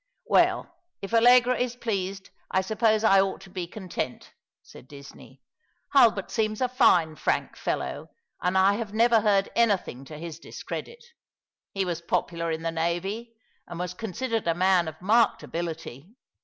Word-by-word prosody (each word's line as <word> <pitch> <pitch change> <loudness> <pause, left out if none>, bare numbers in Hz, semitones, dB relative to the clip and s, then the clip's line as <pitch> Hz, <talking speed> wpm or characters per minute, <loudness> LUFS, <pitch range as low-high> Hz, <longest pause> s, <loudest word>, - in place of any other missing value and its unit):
" - - -49
Well, 350 - +2 0.3
if 195 - -6
Allegra 245 +2 +6
is 245 -1 -1
pleased, 195 -5 -4 0.2
I 190 - +1
suppose 220 +2 +1
I 195 -3 +6
ought 195 0 -2
to 190 -1 -14
bo 180 -2 -4
content," 180 -9 -6 0.3
said 125 - -15
Disney. 140 0 -14 0.2
" - - -33
Hulbert 230 -8 +4
seems 215 -2 -1
a 255 - +2
fine, 175 - +3
frank - - -1
fellow, - - -4 0.3
and 180 +1 +1
I 190 +1 +5
have 215 -3 -5
never 230 0 +4
heard 200 -2 +2
anything 200 - +1
to 150 +2 -10
his 165 0 -8
discredit. 475 - -8 0.7
He 195 -1 0
was 170 -2 -3
popular 170 0 -2
in 160 0 -3
the 165 - -1
navy, 190 +8 -3 0.3
and 175 - -8
was 180 0 -3
considered 225 +2 -3
a 165 - +2
man 180 -1 +3
of 160 0 -7
marked 225 +2 +3
ability. 165 -3 -6
195 Hz, 165 wpm, -26 LUFS, 170-225 Hz, 0.7 s, Allegra